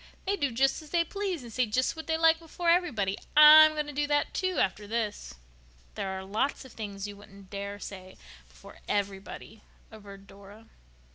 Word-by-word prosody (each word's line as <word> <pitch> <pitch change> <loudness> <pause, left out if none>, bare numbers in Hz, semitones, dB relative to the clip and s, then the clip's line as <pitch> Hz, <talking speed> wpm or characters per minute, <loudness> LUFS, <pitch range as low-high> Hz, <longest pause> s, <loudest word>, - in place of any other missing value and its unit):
They 395 - 0
do 285 -7 -1
just 270 +6 +1
as 310 - -14
they 340 +1 +2
please 375 -4 -4
and 235 -2 -11
say 250 0 +1
just 255 +8 0
what 320 - -9
they 320 0 0
like 325 0 +4
before 335 +1 -1
everybody. 230 - 0 0.2
I'm 310 +1 +9
going 300 -1 -2
to 295 - -7
do 290 +1 -1
that, 290 0 0
too, 370 -1 -2
after 200 +2 -1
this." 210 - -4 0.6
"There 195 - -4
are 190 - -7
lots 220 +9 -2
of 260 - -14
things 200 -2 -6
you 205 - -9
wouldn't 200 -1 -16
dare 200 0 -5
say 185 -2 -10 0.3
before - - -16
everybody," 200 +2 -4 0.3
averred 200 -2 -13
Dora. 200 +3 -15
225 Hz, 190 wpm, -28 LUFS, 200-310 Hz, 0.6 s, I'm